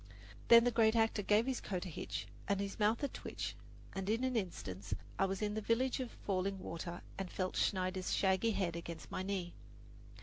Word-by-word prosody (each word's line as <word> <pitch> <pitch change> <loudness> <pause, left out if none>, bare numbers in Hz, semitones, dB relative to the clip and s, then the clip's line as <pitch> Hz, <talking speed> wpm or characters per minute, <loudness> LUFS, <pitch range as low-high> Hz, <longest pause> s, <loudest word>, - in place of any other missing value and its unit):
Then 235 0 +10
the 245 - +3
great 225 -1 +4
actor 225 -2 +3
gave 210 +3 +4
his 260 -1 -1
coat 185 -2 -3
a - - -4
hitch 160 - -4 0.2
and 200 -1 +1
his 200 +1 -3
mouth 220 +5 +3
a - - +3
twitch, - - -5 0.4
and 195 0 -3
in 225 +3 +1
an 260 -1 +1
instant 105 - -3 0.3
I 195 - +5
was 195 +2 -2
in 210 0 0
the 215 - -2
village 245 +5 +1
of 255 -2 -2
Falling 195 -1 -1
Water 170 -1 -5 0.2
and 190 -2 -3
felt 185 -1 -2
Schneider's 185 -1 0
shaggy 190 +3 +3
head 185 -6 0
against 170 -1 -7
my - - -2
knee. 185 -3 -2
200 Hz, 200 wpm, -36 LUFS, 185-225 Hz, 0.4 s, Then